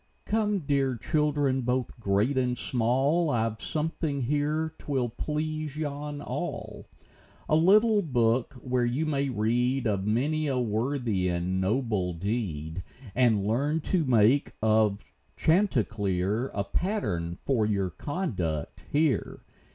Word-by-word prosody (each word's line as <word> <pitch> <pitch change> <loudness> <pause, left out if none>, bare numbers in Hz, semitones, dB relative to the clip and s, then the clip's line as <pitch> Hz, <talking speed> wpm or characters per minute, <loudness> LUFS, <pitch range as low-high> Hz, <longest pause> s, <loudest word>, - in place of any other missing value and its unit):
Come, 215 -1 +1 0.5
children 145 -3 +1
dear, - - -1
both 125 0 -2
great 105 +5 +1
and 125 -1 +1
small; 135 +9 +1
I've 115 -4 -1
something 155 -2 -2
here 150 +4 0
'twill 130 -4 -1
please 155 +3 -3
yon 145 -1 -4
all - - -5 0.3
— - - -27
A 155 - +3
little 205 +6 +5
book, 120 - +1
where 125 0 -1
you 125 +6 0
may 140 -2 0
read 125 +3 +1
Of 100 -2 0
many 150 +8 +1
a 135 -2 0
worthy, 115 -4 0
noble 95 +2 0
deed, 85 -4 -3 0.3
And 110 -5 +3
learn 140 +9 +1
to 175 +2 +1
make 125 +1 +3
of 110 -2 +2 0.3
Chanticleer 115 - +1
A 100 - 0
pattern 100 - -2
for 115 -6 +2
your 100 -3 0
conduct 90 - -3
here. 150 -2 +1
125 Hz, 120 wpm, -28 LUFS, 105-150 Hz, 0.5 s, little